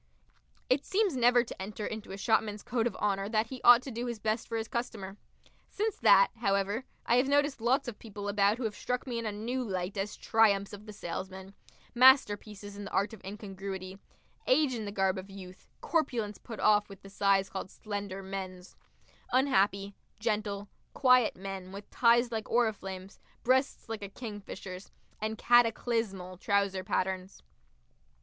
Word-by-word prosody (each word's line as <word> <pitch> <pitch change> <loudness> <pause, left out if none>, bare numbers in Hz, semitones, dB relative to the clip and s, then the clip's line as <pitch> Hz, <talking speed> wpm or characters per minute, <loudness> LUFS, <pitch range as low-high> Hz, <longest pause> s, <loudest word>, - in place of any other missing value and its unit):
It 265 +2 +2
seems 395 -5 +1
never 245 -1 +5
to 230 - -9
enter 210 +2 -5
into 215 -3 -6
a 195 - -6
shopman's 210 0 +1
code 240 -1 0
of - - -5
honour 200 -1 -1
that 215 0 +2
he 255 +2 -8
ought 245 +1 +8
to 270 - -6
do 240 +2 -4
his 235 -1 -3
best 215 +1 -1
for 230 - -2
his 220 0 -3
customer. 220 -6 -4 0.5
Since 430 0 -2
that, - - +6
however, 200 +2 0 0.2
I 240 - +3
have 255 +2 +3
noticed 285 -2 +2
lots 255 +4 +2
of 230 -3 -6
people 205 -2 -7
about 205 +1 +3
who 255 - -4
have 220 -2 -1
struck 250 0 -3
me 240 -3 -3
in 230 - -3
a - - -1
new 235 +5 -3
light 190 -3 -3
as 195 +2 -3
triumphs 205 -3 +3
of 205 +1 -10
the - - -7
salesman, 190 0 -6 0.4
masterpieces 210 -5 +4
in 205 0 -7
the - - -6
art 200 +3 0
of 220 - -12
incongruity; 195 -1 -7 0.5
age 275 0 +4
in 225 -3 -4
the 200 - -4
garb 190 -1 +1
of 190 +1 -10
youth, 185 -2 -11
corpulence 240 -10 -1
put 225 -3 -9
off 210 -1 +4
with 195 -1 -12
the - - -10
size 195 -1 +2
called 190 0 -6
"slender 200 -2 -5
men's"; 190 -1 -7 0.6
unhappy, 200 -7 +2 0.3
gentle, 210 -2 -2 0.3
quiet 255 -4 +5
men 190 0 -7
with 200 +1 -9
ties 235 0 +4
like 220 -1 -3
oriflammes, 195 -5 -1 0.2
breasts 260 +2 +1
like 225 -1 -5
a 200 - -6
kingfisher's, 200 -4 -8 0.3
and 220 +1 -2
cataclysmal 225 -6 +2
trouser 200 -2 +1
patterns. 185 - -2
210 Hz, 170 wpm, -30 LUFS, 195-240 Hz, 0.6 s, ought